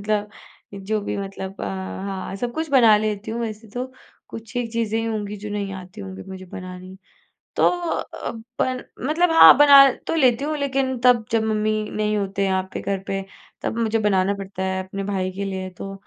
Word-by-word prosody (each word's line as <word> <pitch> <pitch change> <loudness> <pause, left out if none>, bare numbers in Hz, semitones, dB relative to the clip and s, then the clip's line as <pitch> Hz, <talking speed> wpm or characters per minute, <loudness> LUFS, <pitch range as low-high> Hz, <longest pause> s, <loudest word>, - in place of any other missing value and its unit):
मतलब 210 0 -1 0.5
जो 215 +1 0
भी 205 - -3
मतलब 195 0 -6
अ - - -2
हाँ, 190 0 -5
सब 240 +3 -3
कुछ 320 -1 -3
बना 235 -6 +6
लेती 210 0 -2
हूँ 235 +1 -3
वैसे 220 -1 -5
तो, 250 +3 -5 0.4
कुछ 225 +2 -10
ही 245 -1 0
चीज़ें 225 0 -1
होंगी 210 -2 -3
जो 210 +1 -7
नहीं 200 -1 -3
आती 185 -1 -9
होंगी 95 0 -8
मुझे 190 0 -8
बनानी। 185 +1 -9 0.6
तो - - +5
अ, 350 -1 -3 0.3
पल 255 -1 -1 0.2
मतलब 335 +3 +2
हाँ, 325 - +9
बना 280 -1 +9 0.2
तो - - -1
लेती 260 -4 +3
हूँ 305 +1 -1
लेकिन 270 -2 0
तब 245 -3 +5
जब 225 -1 +3
मम्मी 215 0 0 0.2
नहीं 210 0 0
होते 195 -1 -1
यहाँ 190 -1 +1
पे - - -4
घर 195 -1 -2
पे 195 0 -2 0.4
तब 230 - -2
मुझे 225 -1 +1
बनाना 200 -2 +2
पड़ता 195 -1 -6
है 190 0 -1
अपने 195 +1 -5
भाई 190 -2 -1
के 200 +2 -4
लिए, 190 -1 -4
तो 195 +2 -8
210 Hz, 195 wpm, -22 LUFS, 195-235 Hz, 0.6 s, हाँ